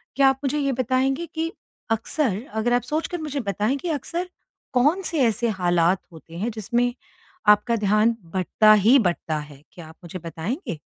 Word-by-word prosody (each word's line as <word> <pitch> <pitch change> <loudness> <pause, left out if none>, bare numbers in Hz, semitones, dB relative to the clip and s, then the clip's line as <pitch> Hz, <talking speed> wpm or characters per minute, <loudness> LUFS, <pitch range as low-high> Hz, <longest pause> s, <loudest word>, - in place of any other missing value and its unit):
क्या 275 -1 +5
आप 270 0 -1
मुझे 275 +2 0
ये 275 -1 +1
बताएँगे 260 +5 0
कि 325 +1 -1 0.4
अक्सर 225 -1 0
अगर 220 +2 0
आप 245 - +3
सोच 305 +6 -2
कर 355 - -4
मुझे 295 -2 -3
बताएँ 210 +7 0
कि 345 - -5
अक्सर 335 +4 -3 0.4
कौन-से 305 +4 +2
ऐसे 230 +2 0
हालात 175 -1 +2
होते 165 0 -12
हैं 225 +6 -2
जिसमें 240 +3 0 0.5
आपका 210 +3 +5
ध्यान 215 +2 +2 0.2
बटता 215 +3 +4
ही 215 +6 +6
बटता 175 -5 -1
है, 150 -1 -11
क्या 170 -3 -11
आप 160 - -14
मुझे 175 +2 -7
बताएँगे? 170 - -5
230 Hz, 170 wpm, -23 LUFS, 185-270 Hz, 0.5 s, ही